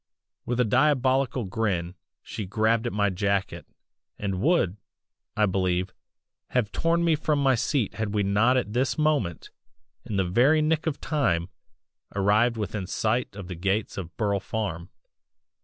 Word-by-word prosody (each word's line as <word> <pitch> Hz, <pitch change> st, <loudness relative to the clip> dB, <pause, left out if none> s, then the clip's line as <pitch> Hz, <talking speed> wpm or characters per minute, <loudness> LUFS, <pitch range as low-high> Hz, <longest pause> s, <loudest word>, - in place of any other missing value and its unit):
"With 125 Hz, 0 st, -1 dB
a 125 Hz, -, +4 dB
diabolical 130 Hz, 0 st, +2 dB
grin 95 Hz, -4 st, -1 dB, 0.3 s
she 105 Hz, -, -6 dB
grabbed 110 Hz, +3 st, +1 dB
at -, -, -2 dB
my 100 Hz, -1 st, +1 dB
jacket 100 Hz, +1 st, -1 dB, 0.5 s
and 95 Hz, -3 st, -3 dB
would, 140 Hz, -, +2 dB, 0.6 s
I 105 Hz, -, +4 dB
believe, 95 Hz, -1 st, 0 dB, 0.5 s
have 120 Hz, -5 st, 0 dB
torn 170 Hz, +1 st, +1 dB
me 170 Hz, -1 st, +3 dB
from 155 Hz, -1 st, 0 dB
my 135 Hz, -2 st, +3 dB
seat 130 Hz, -1 st, 0 dB
had 110 Hz, -2 st, -3 dB
we 105 Hz, -1 st, +1 dB
not 110 Hz, +6 st, +3 dB
at 105 Hz, -4 st, -2 dB
this 130 Hz, +5 st, 0 dB
moment, 150 Hz, -, 0 dB, 0.5 s
in 105 Hz, -, -5 dB
the 95 Hz, -1 st, +1 dB
very 125 Hz, -, +4 dB
nick 155 Hz, +1 st, +1 dB
of 145 Hz, -3 st, -1 dB
time, 90 Hz, -, 0 dB, 0.7 s
arrived 105 Hz, +4 st, +3 dB
within 105 Hz, -3 st, -3 dB
sight 110 Hz, +2 st, -1 dB
of 100 Hz, -3 st, -8 dB
the 90 Hz, -, -5 dB
gates 95 Hz, +5 st, -1 dB
of 90 Hz, -3 st, -7 dB
Burle 100 Hz, -3 st, +1 dB
Farm. 95 Hz, -4 st, -4 dB
110 Hz, 155 wpm, -26 LUFS, 95-130 Hz, 0.7 s, a